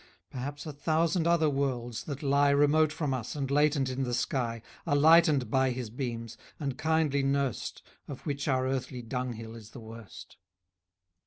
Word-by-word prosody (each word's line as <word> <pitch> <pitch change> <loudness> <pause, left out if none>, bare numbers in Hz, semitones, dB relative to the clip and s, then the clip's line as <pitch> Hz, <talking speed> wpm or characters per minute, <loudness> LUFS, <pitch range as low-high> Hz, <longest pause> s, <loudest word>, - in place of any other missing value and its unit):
Perhaps 140 +3 -5
a 155 - -5
thousand 165 +3 +1
other 170 -2 +4
worlds, 130 -5 -2
that 145 -1 -6
lie 140 0 +4
Remote 145 +2 +4
from 150 -3 -2
us, 125 0 -4
and 140 -2 -3
latent 145 -1 +3
in 130 +1 -3
the 125 -2 -1
sky, 120 -3 -2 0.2
Are 145 - +2
lightened 155 -3 +5
by 130 -1 +3
his 125 -3 -4
beams, 115 -2 -5 0.2
and 140 -4 -2
kindly 155 -2 +1
nurst, 135 -3 -1 0.2
Of 140 - -8
which 140 -2 -3
our 130 -2 +2
earthly 130 -1 -3
dunghill 115 -2 -4
is 110 -2 -11
the 125 - -11
worst. 115 -1 -11
135 Hz, 165 wpm, -29 LUFS, 125-145 Hz, 0.2 s, lightened